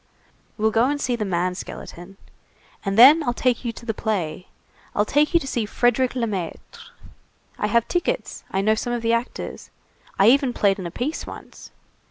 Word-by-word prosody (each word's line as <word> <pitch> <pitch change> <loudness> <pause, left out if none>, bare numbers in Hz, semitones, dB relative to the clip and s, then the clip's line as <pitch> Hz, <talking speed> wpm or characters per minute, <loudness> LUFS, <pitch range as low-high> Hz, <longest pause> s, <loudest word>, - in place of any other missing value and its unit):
We'll 220 0 +2
go 225 +2 +3
and 290 +2 -1
see 250 -3 0
the 215 -3 -3
man 180 -1 0
skeleton. 180 +1 -9 0.7
And 195 0 -2
then 280 +8 +9
I'll 245 -5 -1
take 250 -1 0
you 235 - -2
to 235 - -12
the 225 - -1
play. 185 -7 -3 0.5
I'll 210 - +2
take 295 +6 +2
you - - +7
to 275 - -7
see 235 -5 -2
Frédérick 245 +3 +1
Lemaître. 210 -9 -5 0.7
I 210 - 0
have 235 +2 +2
tickets, 350 - -2
I 190 - -1
know 215 +2 +3
some 240 +2 -2
of 240 -1 -3
the 230 0 +2
actors, 235 +2 -4 0.5
I 200 +3 +6
even 270 -1 +3
played 200 -3 +2
in 180 - -4
a - - -8
piece 275 - -4
once. - - -11
230 Hz, 190 wpm, -23 LUFS, 195-250 Hz, 0.7 s, then